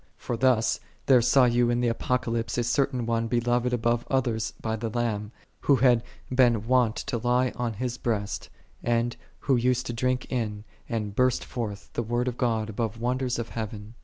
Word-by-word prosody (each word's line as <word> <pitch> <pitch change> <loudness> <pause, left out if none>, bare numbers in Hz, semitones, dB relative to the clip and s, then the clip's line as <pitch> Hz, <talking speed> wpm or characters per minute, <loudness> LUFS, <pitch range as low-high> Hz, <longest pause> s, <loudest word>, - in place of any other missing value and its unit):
For 120 - -3
thus 115 -2 +2 0.3
there 130 -3 +6
saw 125 +2 +5
you 120 0 +3
in 120 0 +1
the 120 - +1
Apocalypse 115 0 -1
a 120 - +2
certain 125 0 +1
one 115 0 0
8 - - -5
beloved 120 +1 +1
above 120 0 +1
others 120 -4 0
by 110 -1 -2
the 115 +1 -3
Lamb, 110 -2 -2 0.3
who 140 - +4
had 125 -2 +4 0.3
been 120 -4 +4
wont 125 -2 +3
to 120 - -3
lie 125 +2 +2
on 120 -2 -2
His 125 +3 -3
breast, 105 -4 -2 0.3
and 120 0 +1 0.3
who 135 - +2
used 125 +1 +1
to 120 - -3
drink 125 +1 0
in, 105 -5 -2 0.3
and 105 -3 -3
burst9 125 0 +2
forth, 105 -4 -6
the - - -1
Word 120 +2 -1
of 125 - -1
God 115 -3 +1
above 110 0 -3
wonders 125 +1 0
of 115 -1 -4
heaven. 110 -1 -6
120 Hz, 190 wpm, -27 LUFS, 115-125 Hz, 0.3 s, there